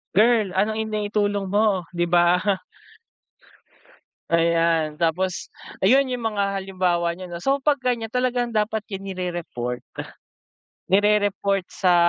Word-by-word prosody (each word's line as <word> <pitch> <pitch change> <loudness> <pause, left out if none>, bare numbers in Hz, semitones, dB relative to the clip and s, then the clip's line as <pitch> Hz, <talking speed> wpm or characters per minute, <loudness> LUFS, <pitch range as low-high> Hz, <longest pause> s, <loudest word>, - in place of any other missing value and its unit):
Girl 220 -1 +4
anong 215 +2 +1
ini-itulong 205 -1 -1
mo 205 -4 +2
'di 175 0 0
ba. 175 +1 +4 1.9
Ayan, 165 -2 +2
tapos 175 +3 -1 0.3
ayan 265 +7 +5
'yung 250 -2 -4
mga 200 -3 -1
halimbawa 185 -3 0
niyan 175 0 -8
'no. 170 - -8
So 275 +1 +2
'pag 280 -1 +1
ganiyan 240 -3 0
talagang 245 0 -1
dapat 215 +1 +1
'yan 195 -1 -6
nire-report. 170 -10 -4 1.1
Nire-report 200 -1 +2
sa 180 -2 +2
195 Hz, 115 wpm, -23 LUFS, 175-220 Hz, 1.9 s, ayan